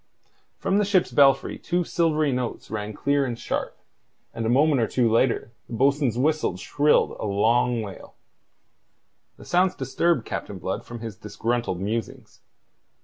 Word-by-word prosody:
From 195 +2 +1
the - - +3
ship's 195 -3 +2
belfry 135 -1 +3
two 175 0 -1
silvery 155 -4 +1
notes 125 -4 -4
rang 105 -1 -3
clear 140 +6 0
and 120 -3 -3
sharp, - - -4 0.6
and 115 -1 -3
a - - +1
moment 140 +1 +3
or 115 - +1
two 120 +1 +1
later 115 0 +1 0.2
the - - -8
bo'sun's 135 -1 +2
whistle 150 - +1
shrilled 145 +9 +2
a - - -3
long 115 +3 +2
wail. 100 -2 -10 1.2
The - - -13
sounds 180 +1 +2
disturbed 135 +1 0
Captain 100 - -5
Blood 95 +1 -4
from 120 -1 -8
his 110 -2 -7
disgruntled 115 -2 -2
musings. 110 +3 -5
125 Hz, 150 wpm, -24 LUFS, 110-150 Hz, 1.2 s, the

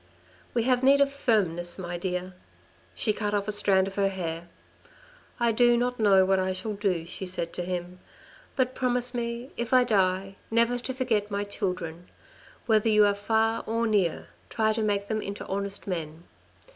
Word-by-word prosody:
"We 235 - +2
have 250 0 +2
need 275 +2 +5
of 280 0 +3
firmness, 175 -10 +1
my 175 -2 -5
dear." 180 +1 -3 0.6
She 215 - +1
cut 210 0 -2
off 200 0 -1
a - - 0
strand 195 -2 +3
of 195 - -6
her 200 -1 +3
hair. 170 -3 -5 0.5
" - - -27
I 235 -1 +3
do 240 +1 +4
no 245 +1 0
know 195 -3 +5
what 190 0 +2
I 185 0 0
shall 215 +3 -4
do," 195 -5 -1
she 185 +2 -6
said 170 -2 -3
to - - -3
him, 180 0 -5 0.3
" - - -24
but 255 -1 +1
promise 250 -1 0
me 235 +2 -4
if 235 +1 -3
I 255 - +6
die, 195 -3 +1
never 235 +2 +2
to 260 +2 -3
forget 225 -6 0
my 200 0 -2
children. 180 -4 -4 0.6
Whether 220 -1 +3
you 210 -1 +5
are 205 - +3
far 220 +2 0
or 230 +1 0
near, 200 -7 0 0.2
try 220 -1 +1
to 220 - -2
make 200 -2 0
them 215 0 -1
into 200 0 -6
honest 200 +1 -4
men. 165 -3 -5
205 Hz, 190 wpm, -27 LUFS, 185-235 Hz, 0.6 s, I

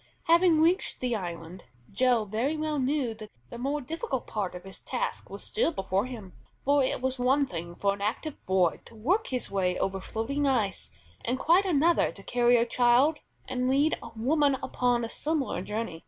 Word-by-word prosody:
Having 335 -1 +5
reached 345 +4 +2
the 250 -2 0
island, 175 -2 -6 0.3
Joe 245 0 +2
very 235 +10 -1
well 305 -1 -1
knew 265 -3 0
that 215 -1 -10 0.2
the - - -7
more 280 +4 -1
difficult 310 - -4
part 200 -4 -3
of 180 - -8
his 195 0 -11
task - - -4
was - - -6
still 435 -5 +1
before 195 - -1
him, 220 -8 -9 0.3
for 285 0 +4
it 260 - -1
was 260 0 -1
one 270 +3 +3
thing 170 -5 -6
for 200 +2 +1
an 200 - -9
active 245 +8 -3
boy 185 -2 +2
to 230 - -15
work 345 - +1
his 250 -5 -4
way 185 -2 0
over 195 0 -1
floating 275 +9 -2
ice, 220 -8 0 0.3
and 250 +2 -1
quite 345 +8 +4
another 335 -1 +3
to 195 - -13
carry 245 +1 +3
a 230 - +3
child 245 +6 +3 0.3
and 255 0 -1
lead 285 +4 +3
a - - -8
woman 280 +4 +2
upon 245 -1 +1
a - - -4
similar 295 - -2
journey. 210 -3 -4
250 Hz, 190 wpm, -28 LUFS, 210-290 Hz, 0.3 s, Having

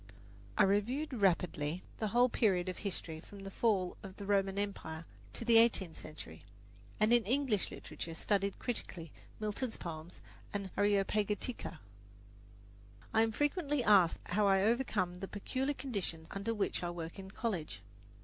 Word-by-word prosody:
I - - +7
reviewed 235 +10 +1
rapidly 180 -6 +1 0.2
the 220 - 0
whole 245 +4 +5
period 195 -7 +2
of 185 - -5
history 175 -5 -2
from 200 +4 -12
the 195 - -6
fall 195 -5 +1
of 190 -2 -9
the 200 - -6
Roman 195 -1 +2
Empire 170 -5 -3 0.3
to 230 - -4
the 230 -1 +7
eighteenth 195 -8 +3
century, 80 - -10 0.6
and 215 +2 +5
in 240 -1 +6
English 245 -3 +1
literature 165 -1 -7
studied 200 +2 0
critically 175 - -5 0.3
Milton's 215 +3 -2
poems 165 0 -7 0.3
and 200 -2 -3
"Areopagitica." 205 +3 0 1.4
I 220 - +5
am 225 0 +3
frequently 290 - +1
asked 195 -6 +6
how 205 +3 +2
I 195 0 +5
overcome 210 -6 +1
the 195 - -4
peculiar 260 +8 -2
conditions 195 - -3
under 200 +3 -2
which 210 -3 0
I 175 - -1
work 170 +1 -6
in 190 0 -8
college. 180 - -3
200 Hz, 150 wpm, -34 LUFS, 180-225 Hz, 1.4 s, I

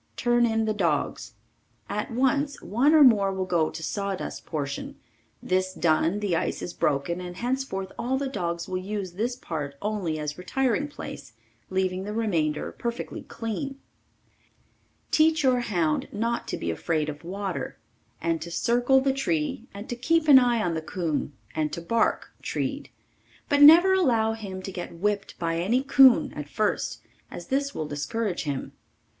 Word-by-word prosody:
Turn 240 0 +3
in 225 -1 +1
the 215 - 0
dogs. 170 -8 -1 0.5
At 210 - -3
once 270 +4 +1
one 260 - +3
or 305 - +8
more 205 -7 +5
will 190 -1 -2
go 170 -4 +1
to 160 - -8
sawdust 200 +1 -4
portion, 140 -4 -4 0.5
this 185 0 0
done 165 +4 +2
the 195 -5 0
ice - - -2
is 175 - -5
broken 150 +5 0
and 180 0 -7
henceforth 240 -6 -2
all 260 +2 0
the 280 0 -2
dogs 170 -8 -3
will 185 -1 -2
use 195 -1 -4
this 230 +7 -2
part 150 - -5
only 200 -6 -2
as 150 +1 -4
retiring 265 +8 0
place, 290 - -9 0.4
leaving 185 0 -1
the 210 +2 -5
remainder 165 -9 0
perfectly 235 0 -5
clean. 255 +5 -5 1.3
Teach 315 0 +4
your 255 -2 +4
hound 170 -10 0
not 230 +3 -2
to - - -3
be 85 - -2
afraid 155 - -1
of 150 -1 -6
water, 195 +1 -4 0.4
and 165 -1 -1
to 170 - -6
circle 245 +8 +3
the 270 0 +2
tree 195 - -1
and 200 +2 -9
to 240 - -3
keep 310 +6 +1
an 275 -3 +10
eye 240 -3 +2
on 175 - 0
the 160 - -2
coon 160 -3 -2 0.2
and 155 -1 -1
to - - -3
bark 225 +7 0
treed, - - -3 0.6
but 285 -1 +3
never 340 +6 +9
allow 235 -12 +3
him 195 -4 -7
to 195 - -5
get 175 -2 -6
whipped 200 +3 -2
by 165 -1 -1
any 235 +9 +1
coon 270 -2 +6
at 150 -1 -7
first 215 +4 -1 0.3
as - - -9
this 280 +1 0
will 155 - -2
discourage 175 +7 -2
him. 140 -2 -3
200 Hz, 165 wpm, -26 LUFS, 170-245 Hz, 1.3 s, an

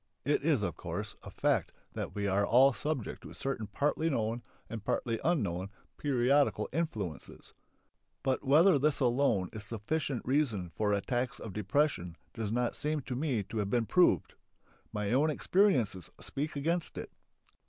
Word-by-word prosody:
It 145 +2 +2
is, 145 -7 +2
of 85 - -2
course, 95 +4 -5
a - - -9
fact - - +1 0.2
that - - -5
we 100 -1 -1
are 100 +1 +2
all 130 +6 +6
subject 145 -4 -3
to - - -10
certain 135 -6 -3
partly 150 +9 0
known 115 -3 -1 0.3
and 115 -2 -6
partly 115 +2 -1
unknown 100 - 0 0.3
periodical 140 0 +2
influences. 110 - -4 0.7
But 130 -1 0
whether 150 +4 +6
this 150 +1 +2
alone 120 -8 +2
is 110 - -6
sufficient 120 +5 -2
reason 120 - 0
for 105 +4 0
attacks 120 +6 -1
of 110 - -7
depression 105 - 0 0.2
does 110 -3 -3
not 120 +1 0
seem 150 0 -1
to 125 -1 -5
me 130 -6 0
to 100 +4 -7
have 100 -1 -1
been 120 +1 +1
proved. 180 +9 +3 0.6
My 105 -1 -2
own 145 +5 +4
experiences 140 - +2
speak 145 +2 -4
against 165 +4 -1
it. - - -6
120 Hz, 155 wpm, -32 LUFS, 105-145 Hz, 0.7 s, all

